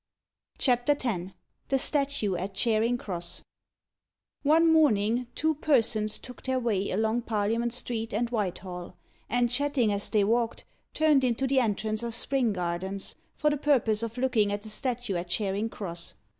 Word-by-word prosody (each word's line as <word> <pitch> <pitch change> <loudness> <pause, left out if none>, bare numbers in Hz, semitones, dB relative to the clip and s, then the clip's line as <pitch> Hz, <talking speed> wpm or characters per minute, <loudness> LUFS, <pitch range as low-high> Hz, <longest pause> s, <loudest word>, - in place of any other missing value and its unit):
] - - -43
CHAPTER 250 +2 +3
X 190 -7 -2 0.4
THE 270 - +2
STATUE 275 -8 0
AT 190 +3 -4
CHARING 230 +3 +2
CROSS 175 -6 -5 1.0
One 320 +3 +5
morning, 240 -6 +3
two 315 +1 +1
persons 235 -8 +2
took 250 - -11
their 260 0 -1
way 210 -5 0
along 220 +4 +1
Parliament 225 +1 0
Street 230 -2 -3
and 230 +4 0
Whitehall, 185 -4 -4 0.3
and, 240 +1 +1
chatting 265 -5 +1
as 200 0 -1
they 210 -2 +3
walked, 230 +2 0 0.3
turned 305 -4 +4
into 250 +1 +1
the 265 0 +3
entrance 215 -1 0
of 235 -1 -2
Spring 265 -4 +1
Gardens, 190 +1 -3 0.2
for 300 0 +2
the 295 - 0
purpose 245 -7 +2
of 230 +1 -4
looking 245 -5 +2
at 205 0 -3
the 220 - -7
statue 245 -4 -2
at 175 +1 -5
Charing 205 +3 -1
Cross. 170 -6 -6
230 Hz, 155 wpm, -28 LUFS, 205-255 Hz, 1.0 s, One